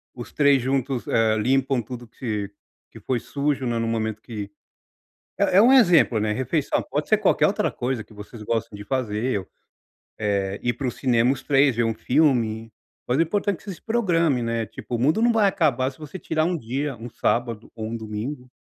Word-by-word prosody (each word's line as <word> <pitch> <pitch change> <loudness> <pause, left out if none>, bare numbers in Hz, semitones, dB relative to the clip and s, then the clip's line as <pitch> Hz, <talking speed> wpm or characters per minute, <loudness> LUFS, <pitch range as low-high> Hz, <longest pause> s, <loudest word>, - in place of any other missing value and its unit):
os 120 -1 -8
3 140 -2 +4
juntos, 130 0 -1
eh, 110 -1 +2
limpam 130 +3 +1
tudo 120 +1 -9
que 105 -4 -4 0.4
que - - -12
foi 125 -2 -1
sujo, 140 +2 -2
né, 120 -1 -1
no 115 0 -1
momento 110 -1 -2
que 105 -4 -7 0.9
é - - +2
é - - +8
um 245 +3 +6
exemplo, 175 - +5
né, 105 0 0
refeição, 130 +6 0
pode - - -2
ser - - +4
qualquer - - +3
outra - - 0
coisa 125 -2 -3
que 110 - -19
vocês 105 +2 -10
gostam 110 -1 -2
de 105 - -9
fazer 120 -2 -1
ou 95 - -13 0.7
eh, 100 -2 -1
ir 120 - 0
para 130 +3 -4
o - - -1
cinema 120 -1 +2
os 135 - -9
3, 135 -2 +3
ver 120 - +1
um 115 0 0
filme, 115 -6 +1 0.4
mas 125 - +1
é - - +6
importante 200 +3 -1
que - - -21
você 200 - -6
se - - -20
programe, 170 - +1
né. 115 -1 -1
Tipo, 120 - -6
o - - -2
mundo 155 - +2
não 240 - +5
vai 215 -3 +4
acabar 145 -10 +1
se 130 - -20
você 155 +4 -9
tirar 155 0 0
1 175 +1 0
dia, 135 +2 -3
um 115 +2 -8
sábado 115 -1 -1
ou 110 -2 -5
um 115 +1 -4
domingo. 115 +5 -6
125 Hz, 210 wpm, -24 LUFS, 115-145 Hz, 0.9 s, é